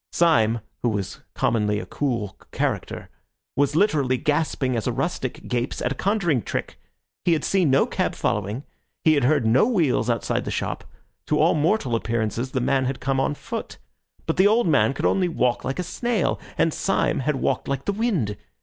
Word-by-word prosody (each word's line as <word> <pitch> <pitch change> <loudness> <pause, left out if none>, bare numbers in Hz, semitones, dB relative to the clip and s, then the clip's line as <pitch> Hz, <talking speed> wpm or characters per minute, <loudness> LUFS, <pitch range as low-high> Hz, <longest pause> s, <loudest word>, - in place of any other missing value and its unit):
Syme, 115 -9 +3 0.2
who 120 - +2
was 100 -3 -3 0.2
commonly 105 -2 +1
a - - -6
cool 115 -8 -2 0.2
character, - - -2 0.5
was 145 +2 +1
literally 150 -9 +2
gaping 145 -2 0
as 115 - -2
a - - +2
rustic - - -3
gapes 120 0 -2
at 125 - -1
a - - +1
conjuring 175 - +1
trick. - - -4 0.4
He 175 - +3
had 155 - 0
seen 185 -6 +2
no 135 +1 +4
cab - - -1
following; 105 +6 -1 0.4
he 160 - +5
had 140 -4 +2
heard 145 -2 +3
no 120 - +4
wheels 160 - +1
outside 115 - 0
the - - -5
shop; - - -3 0.4
to - - +2
all - - +4
mortal 150 - +1
appearances 115 +1 -1
the 130 - -1
man 130 +1 +2
had 130 +1 -2
come 135 0 0
on 140 +2 0
foot. - - -6 0.5
But 160 - -1
the 190 +2 +6
old 225 +3 +3
man 140 -3 +3
could - - -2
only 190 -2 +3
walk 125 -7 0
like 135 +1 -3
a 180 - -1
snail, 230 +3 -1 0.2
and 165 - +2
Syme 195 - 0
had 150 +2 0
walked 135 0 -1
like 135 -1 -2
the 200 - 0
wind. 190 - 0
135 Hz, 190 wpm, -24 LUFS, 120-165 Hz, 0.5 s, the